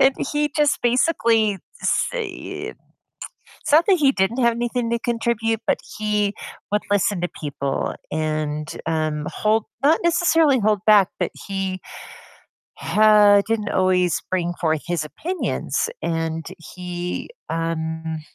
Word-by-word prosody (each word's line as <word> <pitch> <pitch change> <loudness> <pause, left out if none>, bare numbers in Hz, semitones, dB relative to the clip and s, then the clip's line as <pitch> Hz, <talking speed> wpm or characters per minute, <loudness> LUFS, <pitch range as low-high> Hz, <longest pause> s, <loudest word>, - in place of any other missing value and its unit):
and 270 0 +5 0.2
he 295 0 +1
just 295 -1 +2
basically 230 - +2 0.3
say - - 0 0.4
it - - -17 0.9
It's - - -3
not 320 +3 +6
that 385 - +5
he 280 -4 +4
didn't 205 +5 0
have 235 -1 +4
anything 240 0 -2
to 235 - +1
contribute, 230 -1 -1
but - - +2 0.2
he 210 -1 +1 0.4
would 210 - +2
listen 205 -1 +2
to 175 - 0
people, 140 -2 -3 0.2
and, 155 -1 -2 0.2
um, 155 -2 -1
hold 215 +1 +1 0.2
not 315 +3 +5
necessarily 325 -5 +3
hold 210 -1 +2
back, 205 -3 +6
but - - -1 0.2
he 195 -2 -3 1.0
ha 210 -1 +5
didn't 225 -2 -1
always 185 -2 +2
bring 175 -2 0
forth 160 -3 0
his 175 -3 -1
opinions, 355 - -2
and 165 -1 -2
he, 180 - -6 0.2
um 160 -1 -3
205 Hz, 130 wpm, -22 LUFS, 165-235 Hz, 1.0 s, not